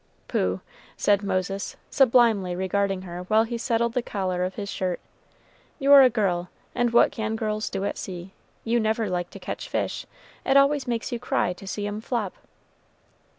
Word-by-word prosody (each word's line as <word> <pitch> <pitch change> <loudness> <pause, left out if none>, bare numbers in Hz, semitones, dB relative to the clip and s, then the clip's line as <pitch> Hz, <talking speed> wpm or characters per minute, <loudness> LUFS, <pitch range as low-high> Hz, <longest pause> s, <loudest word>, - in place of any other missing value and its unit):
"Pooh!" 90 +1 0 0.4
said 200 -1 +3
Moses, 195 0 -2 0.2
sublimely 230 -8 +4
regarding 190 +1 0
her 175 -1 -6
while 215 +3 +4
he 235 +1 -4
settled 235 -1 0
the 250 - +1
collar 185 -5 -2
of 185 +1 -3
his 200 - -4
shirt, 185 -3 -2 0.8
"you're 280 -1 +8
a 260 - +7
girl; 180 -7 0 0.2
and 245 -1 +1
what 235 - +5
can 220 -1 -2
girls 215 -1 -2
do 195 0 -3
at - - -3
sea? 180 0 -7 0.3
you 235 +1 +1
never 220 -2 0
like 175 -1 -2
to - - -10
catch - - -6
fish - - -2 0.4
it 270 - +4
always 275 0 +3
makes 235 -2 -2
you 240 - -2
cry 180 -6 0
to 190 +2 -12
see 205 +1 -3
'em 205 +1 -4
flop." 225 -5 -2
210 Hz, 175 wpm, -25 LUFS, 185-235 Hz, 0.8 s, you're